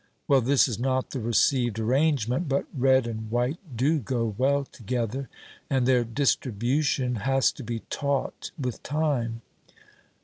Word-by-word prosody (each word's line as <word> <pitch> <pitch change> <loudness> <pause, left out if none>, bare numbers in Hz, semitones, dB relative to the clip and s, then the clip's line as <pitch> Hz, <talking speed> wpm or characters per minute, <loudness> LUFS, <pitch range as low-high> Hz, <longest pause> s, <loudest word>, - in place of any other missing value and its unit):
Well, 135 -2 +5
this 135 +4 +4
is 115 -4 -4
not 130 +1 0
the 135 - -3
received 120 0 +2
arrangement, 130 +3 +1
but 140 - +1
red 130 -1 +4
and 110 -2 -5
white 125 +7 0 0.2
do 150 +6 +2
go 115 -3 -2
well 140 +4 +2
together, 125 +2 -4 0.4
and 130 -3 +2
their 125 -1 +4
distribution 125 +1 0
has 135 +5 +2
to 140 - -10
be 115 -1 -4
taught 140 -2 -2
with 125 -5 -4
time. 130 -6 -1
130 Hz, 140 wpm, -26 LUFS, 115-140 Hz, 0.4 s, Well